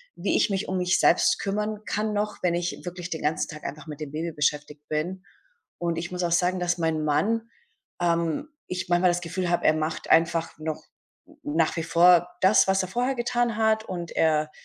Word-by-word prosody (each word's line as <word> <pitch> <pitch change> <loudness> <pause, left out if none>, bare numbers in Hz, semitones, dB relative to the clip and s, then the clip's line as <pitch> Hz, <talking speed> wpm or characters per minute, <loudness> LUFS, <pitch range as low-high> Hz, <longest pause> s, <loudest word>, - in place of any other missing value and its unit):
wie - - -1
ich - - +3
mich 195 -1 -2
um 185 - -1
mich 180 0 +2
selbst - - +4
kümmern 210 +1 -3
kann 215 +1 -1
noch, 210 0 -2
wenn 175 -1 +2
ich 175 +1 -3
wirklich 175 0 -6
den 160 - -3
ganzen 150 +1 0
Tag 155 -1 -9
einfach 150 +2 -6
mit 150 -1 -8
dem 150 -3 -6
Baby 165 +3 -3
beschäftigt 150 0 -2
bin. 175 +5 -3 0.5
Und 170 -1 -2
ich 175 +2 -4
muss 180 0 -3
auch 170 - 0
sagen, 180 +1 +2
dass 175 0 0
mein 160 -2 0
Mann 225 +10 0 0.5
ähm, 170 - 0 0.2
ich 180 0 -4
manchmal 175 +1 +4
das 175 0 -2
Gefühl 175 +2 -3
habe, 175 - 0
er 155 - +6
macht 155 +1 -3
einfach 165 0 +2
noch 155 0 -5 0.4
n - - -20
nach 155 +2 +1
wie 165 - -2
vor 175 +1 +5
das, 190 +2 +5
was 190 0 +3
er 185 - -3
vorher 245 +6 0
getan 240 -1 0
hat 220 -1 +2
und 175 -5 -6
er 155 -1 +1
175 Hz, 210 wpm, -26 LUFS, 160-190 Hz, 0.5 s, er